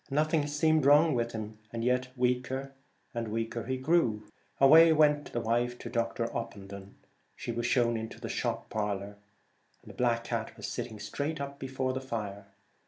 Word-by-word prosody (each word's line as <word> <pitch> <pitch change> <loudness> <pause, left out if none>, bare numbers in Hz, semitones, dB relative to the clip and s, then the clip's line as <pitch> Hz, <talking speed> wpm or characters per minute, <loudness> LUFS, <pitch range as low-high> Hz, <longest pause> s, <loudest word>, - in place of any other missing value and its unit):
Nothing 150 +1 +1
seemed 150 0 +2
wrong 150 +2 +6
with 120 -1 0
him, 110 -1 -6
yet 125 +2 0
weaker 125 +2 -1 0.4
and 115 -1 -3
weaker 115 +2 -3
he 130 0 -1
grew. 130 -7 +2 0.4
Away 160 +4 +8
went 150 -2 +3
the 120 - -2
wife 120 +2 0
to 120 - -8
Dr. 115 -1 -1
Opendon. 100 -3 -7 0.4
She - - -5
was 120 +1 -2
shown 120 -2 +2
into 110 0 -5
the - - -5
shop - - -3
parlour. 100 -1 -3 0.7
A - - -9
black 120 -2 +1
cat 115 -2 -4
was - - -6
sitting 110 -3 -5
straight 145 +6 -3
up 140 0 -6
before 130 -1 -2
the 130 - -3
fire. 105 -6 -5
120 Hz, 165 wpm, -30 LUFS, 115-140 Hz, 0.7 s, Away